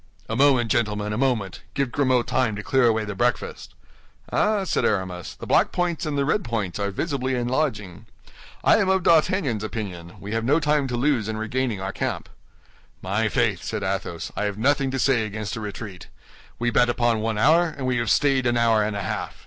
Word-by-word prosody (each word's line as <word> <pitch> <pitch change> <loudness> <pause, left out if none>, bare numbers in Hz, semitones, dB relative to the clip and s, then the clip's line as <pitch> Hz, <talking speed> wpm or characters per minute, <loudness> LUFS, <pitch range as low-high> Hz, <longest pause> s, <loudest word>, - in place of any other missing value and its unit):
"A 110 - -3
moment, 130 -4 +3
gentlemen, 105 -2 0
a - - -2
moment; 120 -8 -1
give 140 -3 0
Grimaud 130 -3 +2
time 125 -5 0
to 105 - -6
clear 130 +2 +3
away 110 -1 +1
the 105 - -4
breakfast." 120 +5 -2 0.6
"Ah, 210 -1 +2
ah!" - - -2
said 190 - 0
Aramis, 95 -4 -2
"the - - -9
black - - +3
points 175 -2 -1
and 145 -2 -2
the 140 - +1
red 180 +8 +1
points 105 -6 -3
are 100 0 -1
visibly 130 - -2
enlarging. 120 - -2 0.6
I - - +5
am 200 -3 +1
of 190 -1 +2
D'Artagnan's 155 - +2
opinion; 95 -6 -6
we 100 - -7
have 115 0 -1
no 145 +7 +3
time 150 -2 +1
to 125 - -3
lose 125 -4 +1
in 110 - -3
regaining 110 -1 -2
our 95 +1 -3
camp." - - -3 0.7
"My 105 +4 0
faith," 110 -6 +1
said 105 +2 -4
Athos, 95 -3 -3
"I 105 - -1
have 105 -1 -3
nothing 135 +3 +2
to 135 - -2
say 130 -3 +2
against 110 +1 -4
a - - -5
retreat. 100 -3 -7 0.5
We 120 0 0
bet 120 0 +3
upon 120 -2 +1
one 110 0 -1
hour, 165 +9 +4
and 140 -5 -6
we 125 -1 +1
have 120 -2 -1
stayed 135 -1 +3
an 120 0 +1
hour 115 -2 +3
and 105 0 -2
a 100 - -3
half. - - -4
120 Hz, 210 wpm, -24 LUFS, 105-135 Hz, 0.7 s, I